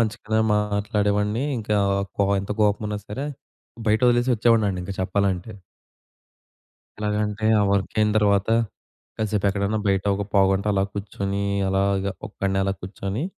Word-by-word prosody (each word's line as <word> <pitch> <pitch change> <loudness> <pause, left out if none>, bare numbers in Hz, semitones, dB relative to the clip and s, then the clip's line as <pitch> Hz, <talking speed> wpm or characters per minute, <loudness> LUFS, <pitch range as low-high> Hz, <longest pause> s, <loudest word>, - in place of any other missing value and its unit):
మంచిగానే 110 0 0 0.2
మాట్లాడేవాడిని 105 +2 0
ఇంకా 105 -1 -1 0.2
ఆహ్, 100 - -1
కో 100 - +3
ఎంత 100 - -8
కోపమున్నా 105 0 0
సరే 135 +7 -4 0.6
బయటొదిలేసొచ్చేవాడినండి 115 -3 +3
ఇంక 100 - -5
చెప్పాలంటే. 95 +1 -1 1.5
ఎలగంటే 105 0 -1
ఆ - - +4
వర్క‌యిన 105 +2 +1
తర్వాత, 100 -1 +2 0.7
కాసేపు 105 -2 -1
ఎక్కడన్నా 100 +2 -1
బయట 95 -1 +2
ఒక 100 - -2
పావుగంట 95 0 +3
అలా 95 -1 +2
కుర్చొని 100 -1 -3 0.3
అలాగా 100 0 +1 0.2
ఒక్కడినే 95 -1 -2
అలా 95 0 0
కుర్చొని, 100 +5 -4
105 Hz, 115 wpm, -23 LUFS, 100-105 Hz, 1.5 s, ఆ